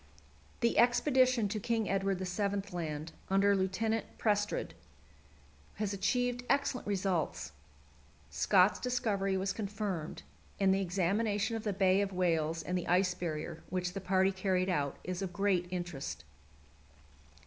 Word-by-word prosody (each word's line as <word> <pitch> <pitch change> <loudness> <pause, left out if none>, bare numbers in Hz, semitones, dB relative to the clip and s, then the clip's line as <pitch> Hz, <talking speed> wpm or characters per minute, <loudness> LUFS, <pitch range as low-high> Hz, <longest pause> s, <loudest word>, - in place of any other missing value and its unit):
The 235 - +3
expedition 250 -1 +4
to 215 - -2
King 225 0 0
Edward 195 0 0
VII. 195 +2 -1
Land, 155 -2 -4 0.2
under 200 +1 +4
Lieutenant 210 +4 0
Prestrud, 210 -1 0 1.0
has 210 -2 -2
achieved 245 +5 0
excellent 275 -4 +1
results. 190 - -1 0.8
Scott's 190 +1 +4
discovery 205 -6 0
was 195 +1 -1
confirmed, 200 -6 -4 0.4
and 195 -1 +4
the 195 - +1
examination 200 +4 0
of 225 - -4
the 210 - +1
Bay 190 0 +3
of 200 -1 -1
Whales 165 -3 0
and 180 - -2
the 180 - -2
Ice 180 +1 +3
Barrier, 165 -2 -4
which 180 -1 -2
the 195 - -4
party 190 +1 +3
carried 185 -1 0
out, 145 -6 0
is 185 +1 -4
of 190 -2 -3
great 185 -1 +1
interest. 175 - -5
195 Hz, 135 wpm, -32 LUFS, 180-210 Hz, 1.0 s, expedition